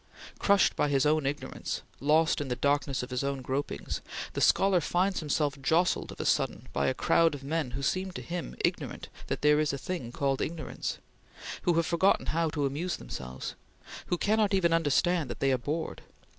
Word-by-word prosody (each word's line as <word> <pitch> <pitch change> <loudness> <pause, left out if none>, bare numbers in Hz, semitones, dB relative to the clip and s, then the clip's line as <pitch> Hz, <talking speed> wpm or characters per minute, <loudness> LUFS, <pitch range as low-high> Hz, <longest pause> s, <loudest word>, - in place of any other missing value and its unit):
Crushed 200 -2 +4
by - - +2
his 135 -1 +2
own 150 -1 +2
ignorance 145 +2 -4 0.2
lost 155 +2 +3
in 145 - -3
the 125 - -1
darkness 140 -1 +1
of 125 - -8
his 125 +1 -1
own 140 -1 -2
gropings 130 - -3 0.3
the - - -2
scholar 190 -2 +4
finds 185 +5 +1
himself 145 -2 -1
jostled 165 +6 +2
of - - -11
a - - -3
sudden - - 0
by 70 - +1
a - - +2
crowd 165 +2 +3
of 135 - -10
men 155 -1 -1
who 140 - -5
seem 185 +5 0
to - - -5
him 175 -1 -5
ignorant - - -3 0.2
that - - -3
there 150 0 +5
is 155 -2 +1
a - - -2
thing 135 -5 -4
called 135 +1 0
ignorance; 165 -1 -4 0.6
who 175 - +2
have 165 0 +2
forgotten 175 +4 +3
how 165 0 +1
to 150 -2 -1
amuse 155 +7 -2
themselves; 65 +1 -6 0.5
who 175 - 0
cannot 210 +1 +2
even 170 -3 +3
understand 165 0 +2
that - - -6
they 135 - +2
are 130 - +2
bored. 155 +6 -3
150 Hz, 195 wpm, -29 LUFS, 135-170 Hz, 0.6 s, there